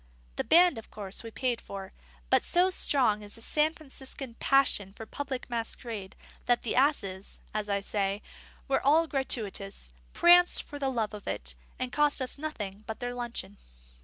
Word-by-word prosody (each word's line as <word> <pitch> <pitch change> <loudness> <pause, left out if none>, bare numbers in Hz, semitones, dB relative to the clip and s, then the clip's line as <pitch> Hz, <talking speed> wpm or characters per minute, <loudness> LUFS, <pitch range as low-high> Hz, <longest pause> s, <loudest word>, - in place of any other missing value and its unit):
The - - -1
band, 345 -6 +5
of 225 - -13
course, 200 -2 -4
we 230 - -6
paid 245 +1 -1
for; 195 -1 -8 0.4
but - - +5
so 360 +2 +3
strong 250 - +4
is 205 0 -9
the 230 - -14
San 305 +4 +2
Franciscan 270 -4 -8
passion 255 -8 +3
for 225 - -9
public 265 +1 -5
masquerade, 230 -4 -5 0.3
that 245 -1 +3
the 230 - -1
asses 205 -9 0
(as 210 -1 -2
I 200 0 +1
say) 200 0 -1 0.4
were 270 - +2
all 310 +4 +5
gratuitous, 205 - -2 0.2
pranced 355 +1 +6
for 290 - -9
the 275 -1 0
love 225 -5 -1
of 210 -1 -9
it, - - -2 0.2
and 255 -1 -3
cost 295 -1 +3
us 260 +1 -1
nothing 215 -10 -5
but 220 - -5
their 245 -1 -3
luncheon. 240 - -5
240 Hz, 170 wpm, -29 LUFS, 205-280 Hz, 0.4 s, pranced